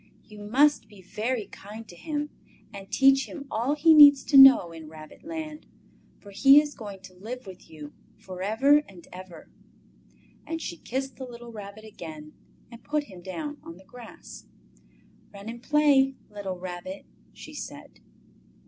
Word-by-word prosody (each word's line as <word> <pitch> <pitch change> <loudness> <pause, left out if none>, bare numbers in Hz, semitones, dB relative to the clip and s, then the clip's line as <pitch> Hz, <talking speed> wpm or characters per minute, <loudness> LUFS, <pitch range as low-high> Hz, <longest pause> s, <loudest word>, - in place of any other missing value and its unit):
"You 210 -1 -14
must 265 +9 +2
be 205 - -17
very 220 +4 -3
kind 215 +3 -12
to 175 - -13
him 295 - -5 0.4
and 195 -1 -10
teach 270 0 +3
him 285 -3 -9
all 245 +7 -1
he 320 +2 +5
needs 285 -3 +8
to 280 - -2
know 270 -10 +8
in 160 -2 -11
Rabbit 155 -1 -14
land, 315 -1 -7 0.5
for 200 - -15
he 275 +8 +7
is 295 -1 -3
going 205 -5 -10
to 190 -1 -14
live 230 +7 -9
with 185 -3 -13
you 150 -2 -11 0.2
for 185 -1 -10
ever 265 +9 +3
and 180 -3 -15
ever!" 180 -2 -12 1.0
And 325 0 -4
she 170 - -6
kissed 265 +7 -5
the 265 - -7
little 240 -1 -11
Rabbit 210 0 -10
again 155 -7 -10 0.4
and 235 0 -13
put 300 0 -1
him 190 -9 -14
down 290 - -7
on 165 - -11
the 190 - -18
grass. 240 +2 -13 0.8
"Run 200 0 -12
and 235 +1 -8
play, 280 -2 +3 0.2
little 200 -3 -6
Rabbit!" 180 +1 -8 0.3
she - - -13
said. - - -10
220 Hz, 165 wpm, -26 LUFS, 185-275 Hz, 1.0 s, needs